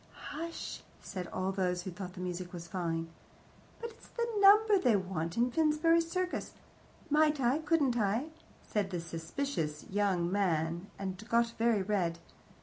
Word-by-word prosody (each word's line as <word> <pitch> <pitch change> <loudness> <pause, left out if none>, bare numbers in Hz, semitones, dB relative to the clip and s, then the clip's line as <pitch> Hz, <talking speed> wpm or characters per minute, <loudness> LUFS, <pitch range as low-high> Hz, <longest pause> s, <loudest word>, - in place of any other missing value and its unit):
"Hush!" 335 +2 -5 0.2
said 180 -2 -6
all 190 +1 -2
those 180 -2 0
who 185 - -5
thought 180 0 -7
the 185 - -8
music 180 0 -4
fine. 165 -1 -3 0.7
"But 465 0 -5
it's 460 - -17
the 470 -1 -2
number 410 +1 +7
they 245 - +4
want 180 -3 -2
in 245 +2 +3
Finsbury 320 +3 +4
Circus 365 +2 -2 0.3
" - - -26
"Might 300 0 +4
I 260 +3 +2
couldn't 295 -6 +2
I 220 +8 +1 0.2
" - - -27
said 205 -2 +1
the 180 -2 -2
suspicious 165 - -3
young 190 -4 +1
man, 170 -2 0
and 190 0 -5
got 235 0 +3
very 230 -3 +2
red. 185 -4 0
200 Hz, 155 wpm, -32 LUFS, -, 0.7 s, number